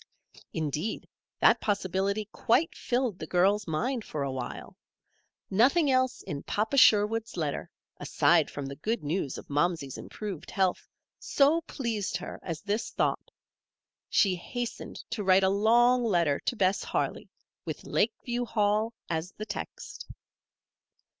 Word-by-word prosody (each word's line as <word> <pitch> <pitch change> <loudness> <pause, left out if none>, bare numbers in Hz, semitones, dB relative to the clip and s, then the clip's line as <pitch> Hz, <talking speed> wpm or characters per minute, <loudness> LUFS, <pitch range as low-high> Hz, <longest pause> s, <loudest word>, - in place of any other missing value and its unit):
Indeed, 155 +6 -3 0.3
that - - +5
possibility 200 +1 0
quite 310 +10 +2
filled 245 -6 -1
the 155 - -6
girl's 195 +4 +2
mind 230 - -1
for 150 -7 -4
a 135 - -2
while. 130 -2 -6 0.8
Nothing 275 - +4
else 255 0 +1
in 140 -1 -5
Papa 220 +6 -1
Sherwood's 225 -3 +4
letter, 150 -4 -2 0.3
aside - - +3
from 145 - -6
the 140 +1 -6
good 225 +6 -2
news 150 -2 -2
of - - -10
Momsey's 145 -2 -1
improved 200 -7 -7
health, 190 -2 0 0.3
so 295 +4 +3
pleased 230 -7 -2
her 180 - -8
as 165 -3 -5
this 210 +2 -2
thought. - - -1 0.8
She 195 -3 +4
hastened 240 +6 -5 0.2
to 225 -3 -2
write 190 0 +5
a 190 - +4
long 240 +5 +4
letter 170 -10 +2
to - - +1
Bess 195 -2 +1
Harley, - - -2 0.3
with - - -6
Lakeview 240 +2 -1
Hall 215 0 +1
as 165 +2 -3
the 215 - -6
text. - - -7
205 Hz, 135 wpm, -29 LUFS, 175-235 Hz, 0.8 s, that